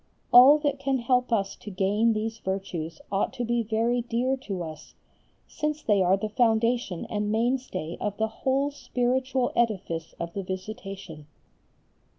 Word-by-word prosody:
All 260 Hz, +5 st, +10 dB
that 290 Hz, -2 st, -1 dB
can 275 Hz, -1 st, 0 dB
help 250 Hz, +1 st, +1 dB
us 200 Hz, -4 st, 0 dB
to -, -, -9 dB
gain 205 Hz, +4 st, +2 dB
these 220 Hz, +1 st, -3 dB
virtues 175 Hz, -5 st, -4 dB
ought 195 Hz, 0 st, +1 dB
to 245 Hz, -, -3 dB
be 240 Hz, 0 st, +1 dB
very 230 Hz, +2 st, 0 dB
dear 240 Hz, +3 st, 0 dB
to 195 Hz, -8 st, -5 dB
us, 155 Hz, -2 st, -10 dB, 0.5 s
since 300 Hz, 0 st, -3 dB
they 205 Hz, -3 st, +3 dB
are 185 Hz, +1 st, +4 dB
the 215 Hz, -, -3 dB
foundation 225 Hz, -3 st, +1 dB
and 210 Hz, 0 st, -2 dB
mainstay 225 Hz, -8 st, -1 dB
of 205 Hz, -1 st, -2 dB
the 220 Hz, -, +1 dB
whole 275 Hz, +2 st, +1 dB
spiritual 255 Hz, -1 st, 0 dB
edifice 185 Hz, -8 st, -1 dB
of 170 Hz, 0 st, -4 dB
the 200 Hz, -, -3 dB
Visitation. 190 Hz, -4 st, -7 dB
220 Hz, 155 wpm, -27 LUFS, 195-250 Hz, 0.5 s, All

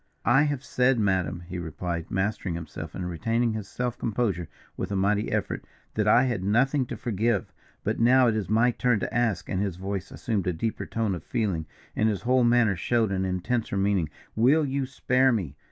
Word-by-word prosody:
"I 135 Hz, +3 st, +5 dB
have 145 Hz, -3 st, -2 dB
said, 130 Hz, -2 st, +2 dB
madam," 95 Hz, -5 st, 0 dB
he 90 Hz, 0 st, -5 dB
replied, 85 Hz, +1 st, -4 dB
mastering 95 Hz, -2 st, -1 dB
himself 85 Hz, -1 st, -7 dB
and 90 Hz, -, -3 dB
retaining 115 Hz, +7 st, 0 dB
his 110 Hz, -2 st, -5 dB
self 125 Hz, +3 st, -3 dB
composure 100 Hz, -7 st, -1 dB, 0.3 s
with -, -, -4 dB
a -, -, 0 dB
mighty 100 Hz, +2 st, +1 dB
effort, -, -, -2 dB, 0.3 s
"that 105 Hz, -1 st, 0 dB
I 120 Hz, +4 st, +6 dB
had 120 Hz, -8 st, -1 dB
nothing 130 Hz, +6 st, +2 dB
to 120 Hz, -, -5 dB
forgive. 110 Hz, -1 st, -1 dB, 0.3 s
But -, -, -1 dB
now 125 Hz, +2 st, +5 dB
it 115 Hz, -2 st, +2 dB
is 100 Hz, -5 st, -2 dB
my 115 Hz, +3 st, +4 dB
turn 120 Hz, -2 st, +1 dB
to -, -, -3 dB
ask," 115 Hz, -8 st, 0 dB
and 95 Hz, -, -1 dB
his 100 Hz, -4 st, -1 dB
voice 95 Hz, +1 st, -4 dB
assumed 105 Hz, -6 st, -2 dB
a 90 Hz, -, +1 dB
deeper 110 Hz, +7 st, -3 dB
tone 110 Hz, -3 st, -1 dB
of 85 Hz, -, -5 dB
feeling, 95 Hz, -9 st, -1 dB, 0.3 s
and 110 Hz, 0 st, +2 dB
his 100 Hz, -3 st, -2 dB
whole 125 Hz, +1 st, +3 dB
manner 120 Hz, -4 st, +4 dB
showed 110 Hz, +3 st, +1 dB
an 95 Hz, 0 st, 0 dB
intenser 95 Hz, +4 st, -1 dB
meaning, 95 Hz, -5 st, +1 dB, 0.3 s
"will 140 Hz, +8 st, +4 dB
you 135 Hz, -1 st, -1 dB
spare 130 Hz, 0 st, +2 dB
me? 90 Hz, -, -2 dB
110 Hz, 200 wpm, -26 LUFS, 95-120 Hz, 0.3 s, I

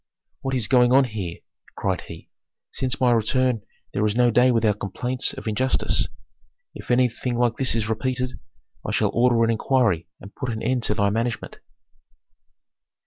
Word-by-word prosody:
"What 135 Hz, 0 st, -2 dB
is 125 Hz, -4 st, +1 dB
going 125 Hz, +1 st, +4 dB
on 135 Hz, +2 st, +6 dB
here?" 105 Hz, -8 st, -5 dB, 0.4 s
cried -, -, -1 dB
he. -, -, -10 dB, 0.4 s
"Since 130 Hz, 0 st, -3 dB
my 125 Hz, -2 st, +4 dB
return 120 Hz, +1 st, +1 dB, 0.3 s
there 105 Hz, -, 0 dB
is 105 Hz, 0 st, +1 dB
no 120 Hz, 0 st, +4 dB
day 125 Hz, +3 st, +5 dB
without 110 Hz, -4 st, +2 dB
complaints 125 Hz, +5 st, -2 dB
of -, -, -9 dB
injustice. 130 Hz, +5 st, +1 dB, 0.7 s
If -, -, -11 dB
anything 125 Hz, 0 st, +1 dB
like 120 Hz, -1 st, +1 dB
this 130 Hz, -3 st, 0 dB
is 110 Hz, -2 st, -1 dB
repeated, 125 Hz, +3 st, -2 dB, 0.4 s
I -, -, -4 dB
shall -, -, +2 dB
order 120 Hz, -1 st, +3 dB
an 115 Hz, -, +3 dB
inquiry 110 Hz, -8 st, +1 dB
and 100 Hz, -, -12 dB
put 130 Hz, -, -4 dB
an 110 Hz, -1 st, -4 dB
end 130 Hz, -1 st, +1 dB
to 105 Hz, -, 0 dB
thy 100 Hz, 0 st, +2 dB
management." 115 Hz, +1 st, -3 dB
120 Hz, 165 wpm, -23 LUFS, 110-125 Hz, 0.7 s, on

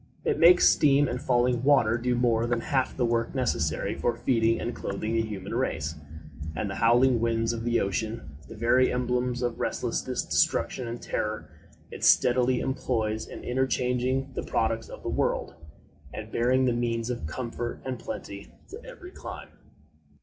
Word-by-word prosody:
It -, -, +1 dB
makes 175 Hz, +2 st, +7 dB
steam 145 Hz, -1 st, +4 dB
and 125 Hz, +1 st, -3 dB
falling 120 Hz, -1 st, +2 dB
water 130 Hz, -5 st, +4 dB
do 125 Hz, +1 st, 0 dB
more 120 Hz, -1 st, +2 dB
than 120 Hz, -1 st, 0 dB
half 130 Hz, -1 st, -1 dB
the 125 Hz, -, +2 dB
work 115 Hz, +2 st, -1 dB
necessary 130 Hz, -3 st, 0 dB
for 120 Hz, -, -1 dB
feeding 115 Hz, -1 st, +2 dB
and 120 Hz, -, -3 dB
clothing 110 Hz, +3 st, -3 dB
the 115 Hz, -, +2 dB
human 105 Hz, -3 st, -5 dB
race; 80 Hz, -, -1 dB, 0.6 s
and 100 Hz, -, -2 dB
the 95 Hz, -, -4 dB
howling 120 Hz, +2 st, +4 dB
winds 115 Hz, 0 st, 0 dB
of 115 Hz, -1 st, -5 dB
the 120 Hz, 0 st, +1 dB
ocean, 110 Hz, -4 st, -3 dB
the -, -, -10 dB
very 120 Hz, +4 st, +3 dB
emblems 125 Hz, 0 st, -1 dB
of 120 Hz, -1 st, -2 dB
resistless -, -, -2 dB
destruction 125 Hz, -2 st, +1 dB
and 120 Hz, +1 st, -6 dB
terror, 105 Hz, 0 st, -3 dB, 0.4 s
it -, -, -8 dB
steadily 125 Hz, 0 st, +4 dB
employs 115 Hz, -5 st, -2 dB
in -, -, -9 dB
interchanging 130 Hz, +1 st, 0 dB
the -, -, -3 dB
products 115 Hz, 0 st, -1 dB
of -, -, -10 dB
the -, -, -3 dB
world, -, -, -1 dB, 0.6 s
and 110 Hz, +1 st, -8 dB
bearing 130 Hz, +2 st, +2 dB
the 125 Hz, -, +2 dB
means 115 Hz, 0 st, -1 dB
of 120 Hz, -11 st, -4 dB
comfort 120 Hz, +5 st, -5 dB
and 130 Hz, -2 st, -4 dB
plenty 100 Hz, -2 st, -7 dB, 0.2 s
to 430 Hz, +5 st, -10 dB
every 480 Hz, -8 st, -11 dB
clime. -, -, -9 dB
120 Hz, 165 wpm, -27 LUFS, 115-130 Hz, 0.6 s, makes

